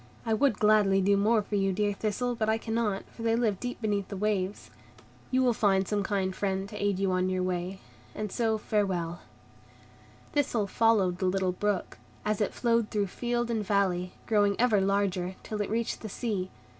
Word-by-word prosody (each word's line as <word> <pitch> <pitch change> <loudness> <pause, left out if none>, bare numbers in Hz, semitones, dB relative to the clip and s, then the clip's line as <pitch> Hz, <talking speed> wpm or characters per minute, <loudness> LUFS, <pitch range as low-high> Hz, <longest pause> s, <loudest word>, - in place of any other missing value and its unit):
I 225 - +1
would 220 -1 +2
gladly 210 -2 +4
do 200 +1 +3
more 210 +2 +3
for 205 - -10
you, 195 -1 +2
dear 205 +2 0
Thistle, 220 +4 -1
but 220 -2 -1
I 220 - +3
cannot, 225 -3 -1
for - - -11
they 225 0 +2
live 220 -5 +1
deep 245 0 -4
beneath 205 -2 0
the 200 - -6
waves. 200 -1 -1 0.6
You 260 0 +2
will 245 -2 +3
find 195 -3 +2
some 210 -1 0
kind 195 -2 -1
friend 195 -1 -1
to 210 -1 -5
aid 200 -2 +1
you 195 -1 +1
on 185 0 +1
your 185 0 0
way; 180 +1 -2 0.4
and 210 -2 -4
so 225 -2 +1
farewell." 185 -6 -1 1.1
Thistle 250 -7 +1
followed 200 -4 +2
the 185 - +1
little 190 0 +1
brook, 200 +1 -2 0.3
as 215 0 0
it 205 - +1
flowed 230 -2 +1
through 205 -1 0
field 240 -1 -1
and 220 -2 0
valley, 190 -3 0
growing 205 -3 +3
ever 225 -5 +4
larger, 190 -2 0
till 215 -1 -3
it 205 - -2
reached 225 +2 -1
the 220 - -6
sea. 200 -4 -2
205 Hz, 195 wpm, -29 LUFS, 190-220 Hz, 1.1 s, gladly